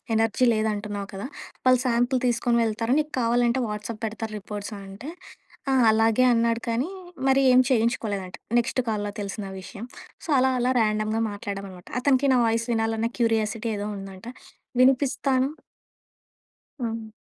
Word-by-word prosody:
Energy 225 Hz, +3 st, +2 dB
లేదు 215 Hz, 0 st, +1 dB
అంటున్నావు 205 Hz, -1 st, -5 dB
కదా! 195 Hz, -, -5 dB, 0.4 s
వాళ్ళు 255 Hz, -1 st, +6 dB
సాంపిల్ 245 Hz, +2 st, +2 dB
తీసుకొని 235 Hz, 0 st, +1 dB
వెళ్తారు. 225 Hz, +3 st, 0 dB
నీకు 300 Hz, 0 st, -2 dB
కావాలంటే 240 Hz, +2 st, +2 dB
వాట్సాప్ 210 Hz, +1 st, -5 dB
పెడతారు 220 Hz, 0 st, -4 dB
రిపోర్ట్స్" 205 Hz, +1 st, -6 dB
అనంటే 200 Hz, +8 st, -9 dB, 0.6 s
ఆ! -, -, +3 dB, 0.2 s
అలాగే 225 Hz, +3 st, +3 dB
అన్నాడు. 230 Hz, 0 st, +1 dB
కానీ 250 Hz, +9 st, 0 dB, 0.4 s
మరి 270 Hz, +1 st, +4 dB
ఏం 255 Hz, -, +7 dB
చేయించుకోలేదంట 220 Hz, -6 st, 0 dB, 0.2 s
నెక్స్ట్ 245 Hz, +2 st, -1 dB
కాల్‌లో 205 Hz, -2 st, -1 dB
తెలిసిన 200 Hz, 0 st, -4 dB, 0.2 s
విషయం. 200 Hz, +5 st, -8 dB, 0.4 s
సో, -, -, -11 dB
అలా 260 Hz, 0 st, +3 dB
అలా 250 Hz, +1 st, +2 dB
ర్యాండమ్‌గా 215 Hz, 0 st, +1 dB
మాట్లాడామన్నమాట. 200 Hz, -3 st, -7 dB
అతనికి 275 Hz, 0 st, +3 dB
నా -, -, +4 dB
వాయిస్ 230 Hz, +1 st, 0 dB
వినాలన్న 225 Hz, 0 st, 0 dB
క్యూరియాసిటీ 225 Hz, 0 st, +1 dB
ఏదో 205 Hz, +1 st, -3 dB
ఉందంట. 195 Hz, +2 st, -9 dB, 0.5 s
వినిపిస్తాను 265 Hz, 0 st, +3 dB, 1.3 s
హ్మ్. 225 Hz, -1 st, -3 dB
225 Hz, 135 wpm, -25 LUFS, 210-245 Hz, 1.3 s, ఏం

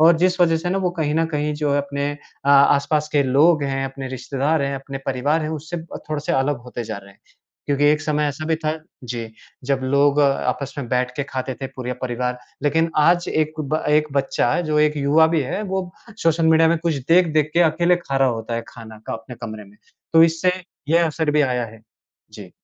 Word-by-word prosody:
और 165 Hz, +1 st, +6 dB
जिस 180 Hz, +1 st, +1 dB
वजह 165 Hz, -2 st, +4 dB
से 175 Hz, +2 st, -3 dB
ना 195 Hz, -, 0 dB
वो 185 Hz, -2 st, 0 dB
कहीं 150 Hz, -1 st, 0 dB
न 165 Hz, -, +2 dB
कहीं 150 Hz, -1 st, -2 dB
जो 150 Hz, -1 st, -1 dB
है, 145 Hz, -, +2 dB
अपने 140 Hz, 0 st, -2 dB, 0.4 s
आ -, -, +4 dB
आसपास 140 Hz, +2 st, +4 dB
के 145 Hz, -1 st, +4 dB
लोग 145 Hz, +4 st, +4 dB
हैं, 135 Hz, -1 st, -1 dB
अपने 135 Hz, 0 st, -6 dB
रिश्तेदार 140 Hz, +4 st, -1 dB
हैं, 140 Hz, 0 st, -1 dB
अपने 135 Hz, 0 st, -6 dB
परिवार 145 Hz, +5 st, 0 dB
हैं 155 Hz, -, -3 dB
उससे 160 Hz, +2 st, -5 dB
अ, 165 Hz, -1 st, -8 dB
थोड़े-से 150 Hz, -1 st, -2 dB
अलग 135 Hz, 0 st, +1 dB
होते 120 Hz, -1 st, -5 dB
जा 110 Hz, -1 st, -5 dB
रहे 100 Hz, 0 st, -15 dB
हैं। 100 Hz, -, -29 dB, 0.5 s
क्योंकि 145 Hz, 0 st, +1 dB
एक 150 Hz, +1 st, +4 dB
समय 150 Hz, -1 st, 0 dB
ऐसा 145 Hz, +2 st, -4 dB
भी 160 Hz, 0 st, +1 dB
था 155 Hz, -1 st, -2 dB, 0.3 s
जी, 115 Hz, -2 st, -5 dB, 0.4 s
जब 135 Hz, 0 st, 0 dB
लोग 140 Hz, +2 st, +3 dB
अ, -, -, +5 dB, 0.2 s
आपस 140 Hz, -1 st, -3 dB
में 125 Hz, -4 st, -4 dB
बैठ 125 Hz, 0 st, 0 dB
के 140 Hz, -, -1 dB
खाते 130 Hz, 0 st, -3 dB
थे 135 Hz, -, -1 dB
पूरे 125 Hz, -1 st, -3 dB
परिवार, 125 Hz, 0 st, -2 dB, 0.2 s
लेकिन 160 Hz, +3 st, +2 dB
आज 175 Hz, +3 st, +3 dB
एक 155 Hz, 0 st, -1 dB
ब 155 Hz, +2 st, -2 dB
1 150 Hz, 0 st, +3 dB
बच्चा 135 Hz, 0 st, +1 dB
जो 150 Hz, -, +2 dB
एक 150 Hz, 0 st, +2 dB
युवा 150 Hz, +3 st, +4 dB
भी -, -, +3 dB
है, 165 Hz, +10 st, -3 dB
वो 190 Hz, -2 st, -3 dB, 0.3 s
सोशल 165 Hz, 0 st, +2 dB
मीडिया 160 Hz, 0 st, +5 dB
में 165 Hz, 0 st, +2 dB
कुछ 165 Hz, -1 st, -1 dB
देख-देख 160 Hz, -3 st, +3 dB
के 175 Hz, -, +4 dB
अकेले 175 Hz, +2 st, +2 dB
खा 140 Hz, -6 st, -4 dB
रहा 135 Hz, -1 st, +4 dB
होता 115 Hz, -1 st, -3 dB
है, 115 Hz, -, -2 dB
खाना 110 Hz, -2 st, -11 dB
का -, -, -3 dB
अपने 115 Hz, +2 st, -8 dB
कमरे 110 Hz, -2 st, -6 dB
में, 100 Hz, +1 st, -19 dB, 0.4 s
तो 165 Hz, 0 st, +7 dB
इससे 165 Hz, +2 st, +1 dB, 0.4 s
यह 170 Hz, +1 st, +4 dB
असर 160 Hz, 0 st, -1 dB
भी 150 Hz, 0 st, +2 dB
आया 125 Hz, -3 st, 0 dB
है। 110 Hz, 0 st, -15 dB, 0.5 s
जी। -, -, -11 dB
145 Hz, 225 wpm, -21 LUFS, 135-160 Hz, 0.5 s, तो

